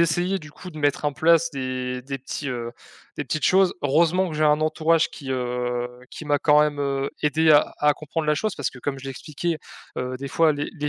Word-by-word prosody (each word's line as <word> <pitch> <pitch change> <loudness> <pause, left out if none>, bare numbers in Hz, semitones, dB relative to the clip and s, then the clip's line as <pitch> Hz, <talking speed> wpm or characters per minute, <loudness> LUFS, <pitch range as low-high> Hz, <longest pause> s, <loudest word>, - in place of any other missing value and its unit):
essayé 175 +4 +1
du 150 -4 -12
coup 180 +4 -11
de 155 - -10
mettre 145 0 0
en 145 - +1
place 165 +3 +3
des 130 -2 -3
des 135 +2 -5
petits, 135 +2 -5
heu, 120 -2 -4 0.5
des - - -2
petites 155 - -2
choses. 190 -1 +4
Heureusement 170 +6 +2
que - - -6
j'ai 155 - +2
un 150 +1 +3
entourage 160 +1 +2
qui, 135 -3 -8
heu, 125 -1 -2 0.2
qui 155 - -8
m'a 145 -1 +2
quand 150 0 +5
même, 150 -1 -1
heu, 140 0 -1
aidé 155 +2 +3
à 150 -1 +5
à 150 0 +4
comprendre 155 +2 -4
la 150 - +3
chose 210 +7 -2
parce 145 - -2
que 125 - -13
comme 135 +1 -3
je 135 - -11
l'ai 135 - -4
expliqué, 155 +5 -4 0.4
heu, 125 0 -3
des 140 - -5
fois 160 +3 +3
les 145 0 -4
les 150 -1 -3
150 Hz, 235 wpm, -24 LUFS, 135-160 Hz, 0.5 s, quand